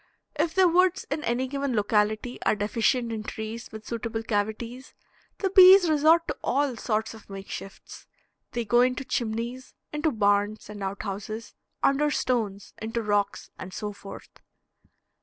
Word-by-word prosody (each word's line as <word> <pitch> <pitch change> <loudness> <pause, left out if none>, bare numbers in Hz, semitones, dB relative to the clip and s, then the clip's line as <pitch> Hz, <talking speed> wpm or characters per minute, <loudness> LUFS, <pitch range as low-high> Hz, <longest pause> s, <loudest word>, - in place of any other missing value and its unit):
If 330 -1 0
the 380 -1 +6
woods 365 +2 +3
in 300 +1 -2
any 240 +3 0
given 275 -1 -2
locality 215 +3 0
are - - +2
deficient 230 +3 0
in 220 -1 -3
trees 220 +2 -6
with 220 0 -9
suitable 225 -1 -4
cavities, 225 +4 -3 0.4
the 385 -2 -1
bees 375 -1 +9
resort 315 +2 +4
to - - -3
all 275 -1 +1
sorts 220 -1 -1
of 220 -2 -14
makeshifts; 195 0 -9 0.5
they 235 -1 -2
go 240 +3 +4
into 255 +2 +1
chimneys, 235 +3 -3 0.2
into 300 +1 +1
barns 205 -1 +1
and 205 -1 -9
outhouses, 200 +3 -5 0.3
under 285 +2 +3
stones, 220 -8 -1
into 225 +1 -3
rocks, 205 -1 -1
and 185 0 -8
so 210 -1 -4
forth. 200 0 -11
230 Hz, 145 wpm, -26 LUFS, 210-275 Hz, 0.5 s, bees